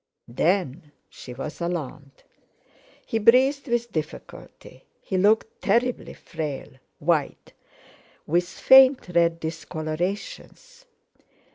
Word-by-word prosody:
Then 160 Hz, +2 st, -1 dB, 0.2 s
she 125 Hz, -, -11 dB
was 150 Hz, +6 st, -7 dB
alarmed. 155 Hz, -5 st, -6 dB, 0.8 s
He 225 Hz, -, -2 dB
breathed 260 Hz, +6 st, +4 dB
with 235 Hz, -1 st, -1 dB
difficulty, 155 Hz, -3 st, -8 dB
he 190 Hz, -, -5 dB
looked 210 Hz, +4 st, +1 dB
terribly 245 Hz, +1 st, 0 dB
frail, 150 Hz, -4 st, -6 dB, 0.3 s
white, 155 Hz, -1 st, -2 dB, 0.7 s
with 175 Hz, +3 st, 0 dB
faint 265 Hz, -2 st, +5 dB
red 170 Hz, -1 st, +2 dB
discolorations. 175 Hz, -, -6 dB
175 Hz, 90 wpm, -24 LUFS, 155-235 Hz, 0.8 s, faint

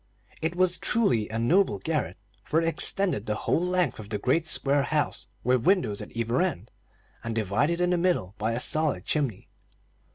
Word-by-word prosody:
It 165 Hz, +2 st, -2 dB
was 185 Hz, 0 st, +1 dB
truly 125 Hz, -, +1 dB
a 110 Hz, -, -4 dB
noble 130 Hz, -, +2 dB
garret, 110 Hz, -, -3 dB, 0.3 s
for 160 Hz, -, 0 dB
it 165 Hz, -, -1 dB
extended 170 Hz, -, +2 dB
the 105 Hz, -, -1 dB
whole 160 Hz, -, 0 dB
length 180 Hz, -9 st, 0 dB
of 105 Hz, -1 st, -9 dB
the 105 Hz, -, -2 dB
great 145 Hz, +10 st, 0 dB
square 140 Hz, -1 st, +4 dB
house, 150 Hz, 0 st, -2 dB, 0.2 s
with 125 Hz, -1 st, +1 dB
windows 175 Hz, -, +2 dB
at -, -, -8 dB
either 115 Hz, +4 st, 0 dB
end, 115 Hz, -, -3 dB, 0.5 s
and 115 Hz, -1 st, -4 dB
divided 115 Hz, -, 0 dB
in 180 Hz, 0 st, +1 dB
the 180 Hz, -, +2 dB
middle 170 Hz, -, 0 dB
by 110 Hz, +2 st, -1 dB
a 115 Hz, -, -2 dB
solid 150 Hz, -, +1 dB
chimney. 140 Hz, -10 st, -2 dB
140 Hz, 185 wpm, -26 LUFS, 110-175 Hz, 0.5 s, square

